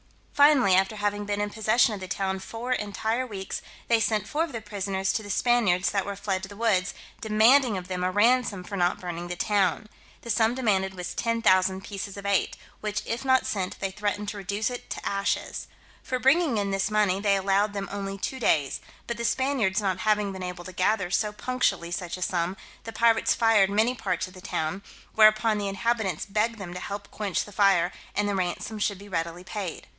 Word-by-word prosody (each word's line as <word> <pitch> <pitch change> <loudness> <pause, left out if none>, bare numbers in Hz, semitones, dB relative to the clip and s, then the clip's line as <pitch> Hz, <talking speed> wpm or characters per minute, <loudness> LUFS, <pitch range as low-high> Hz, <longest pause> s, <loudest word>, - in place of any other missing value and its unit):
Finally, 285 -9 +5
after 190 +3 +3
having 205 0 -1
been 205 0 -2
in 205 0 -1
possession 220 +1 +3
of 205 - -5
the 185 - -7
town 190 0 -2
four 230 +6 -6
entire 220 +2 -1
weeks, 195 -4 -5 0.3
they 230 -1 +4
sent 215 -2 0
four 310 +2 0
of 335 - -5
the 230 - -4
prisoners 195 -2 -2
to - - -1
the 205 - -10
Spaniards 205 -5 +2
that 195 -1 0
were 200 - -5
fled 195 -1 -2
to 190 - -7
the 205 - -10
woods, 200 -4 +1 0.3
demanding 220 +2 +4
of 180 -1 -6
them 180 -1 -3
a 180 - +2
ransom 210 0 +2
for 200 - -7
not 175 -2 +1
burning 175 -1 -5
the 175 - -4
town. 200 +2 +1 0.4
The 235 - -3
sum 220 +2 +2
demanded 195 -6 0
was 180 -1 -5
10,000 190 -5 +2
pieces 200 0 -6
of 200 - -8
eight, 200 -2 +1 0.2
which 210 -1 -3
if 230 +2 -3
not 260 -1 +3
sent, 190 -3 -3
they 195 - -2
threatened 205 +1 -2
to 205 - -6
reduce 200 +4 -2
it 245 - -7
to - - -5
ashes. 200 0 -2 0.3
For 255 - -2
bringing 270 +1 +3
in 200 -1 -1
this 195 +1 0
money, 210 -3 +2
they 200 -1 +3
allowed 195 +2 +1
them 200 -1 -3
only 195 0 -4
two 260 +6 -4
days; 145 - +1 0.2
but 235 - -4
the 235 - -4
Spaniards 235 -5 +1
not 190 -3 -1
having 210 0 +1
been 190 -1 -7
able 180 -1 -5
to 185 - -9
gather 185 0 +1
so 210 +3 +1
punctually 210 -6 -1
such 175 0 -4
a 185 - -3
sum, 175 +1 -1 0.3
the 225 - -5
pirates 230 0 +3
fired 225 -4 +4
many 220 +5 +2
parts 185 -8 -2
of 185 - -14
the 185 - -12
town; 170 +2 -3 0.3
whereupon 215 0 +5
the 200 - -2
inhabitants 200 -3 -1
begged 215 +3 0
them 185 -4 -7
to 180 - -5
help 200 +2 -6
quench 205 -4 -2
the 205 - -12
fire, 195 -3 +3 0.2
and 205 0 +1
the 205 - 0
ransom 190 +3 -2
should 205 -1 0
be 200 +2 -12
readily 170 0 -3
paid. 190 -2 -5
205 Hz, 210 wpm, -26 LUFS, 190-220 Hz, 0.4 s, Finally